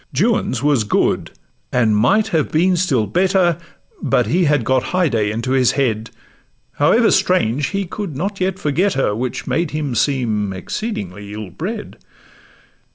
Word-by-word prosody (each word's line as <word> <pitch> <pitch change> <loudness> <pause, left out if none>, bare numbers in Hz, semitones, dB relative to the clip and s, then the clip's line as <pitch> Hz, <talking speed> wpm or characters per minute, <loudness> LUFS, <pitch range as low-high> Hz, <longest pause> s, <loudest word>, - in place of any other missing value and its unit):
Juan's 165 - +1
was 145 -6 +3
good; 105 - 0 0.4
and 115 -4 +2
might 200 - +3
have 160 -3 0
been 180 +4 +3
still 145 -11 +1
better, 180 - +2 0.4
But 125 - +2
he 170 - +1
had 145 -4 +2
got 130 +2 +1
Haidee 125 - +1
into 115 +4 -3
his 130 -2 +3
head: 115 -5 -1 0.7
However - - +4
strange, 125 +7 +2
he 195 -1 -2
could 180 -5 -6
not 195 +5 -3
yet 190 0 0
forget 175 +7 0
her, 120 -6 0
Which 125 +2 -3
made 165 -1 0
him 150 -4 -3
seem 110 -7 0
exceedingly 100 - -5
ill 105 -3 -7
bred. 205 - -6
140 Hz, 150 wpm, -19 LUFS, 110-180 Hz, 0.7 s, However